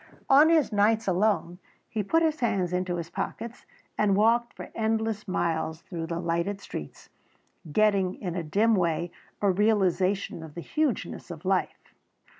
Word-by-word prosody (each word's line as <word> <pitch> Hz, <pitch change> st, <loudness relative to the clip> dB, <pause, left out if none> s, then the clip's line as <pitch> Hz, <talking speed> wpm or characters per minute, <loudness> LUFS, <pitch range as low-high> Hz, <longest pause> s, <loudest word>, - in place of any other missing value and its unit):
On 290 Hz, +4 st, +7 dB
his 320 Hz, -6 st, +3 dB
nights 215 Hz, +1 st, +2 dB
alone, 185 Hz, -2 st, +1 dB, 0.3 s
he 220 Hz, -, -2 dB
put 325 Hz, +12 st, +2 dB
his 315 Hz, -1 st, +1 dB
hands 195 Hz, -7 st, 0 dB
into 180 Hz, 0 st, -1 dB
his 170 Hz, 0 st, -5 dB
pockets 230 Hz, +6 st, -5 dB, 0.3 s
and 200 Hz, -2 st, +3 dB
walked 230 Hz, +3 st, +2 dB
for -, -, -9 dB
endless 220 Hz, -1 st, -1 dB
miles 160 Hz, -3 st, -1 dB
through 165 Hz, -3 st, -5 dB
the 170 Hz, 0 st, -3 dB
lighted 170 Hz, +3 st, -1 dB
streets, 75 Hz, -, -8 dB, 0.6 s
getting 195 Hz, 0 st, +2 dB
in 180 Hz, -4 st, -5 dB
a 175 Hz, -, -2 dB
dim 210 Hz, +8 st, +2 dB
way 170 Hz, -2 st, 0 dB, 0.3 s
a 200 Hz, -, +5 dB
realisation 195 Hz, -2 st, +1 dB
of 160 Hz, -2 st, -10 dB
the 170 Hz, -, -5 dB
hugeness 295 Hz, -, -2 dB
of 170 Hz, 0 st, -9 dB
life. 190 Hz, 0 st, -1 dB
195 Hz, 155 wpm, -27 LUFS, 175-220 Hz, 0.6 s, On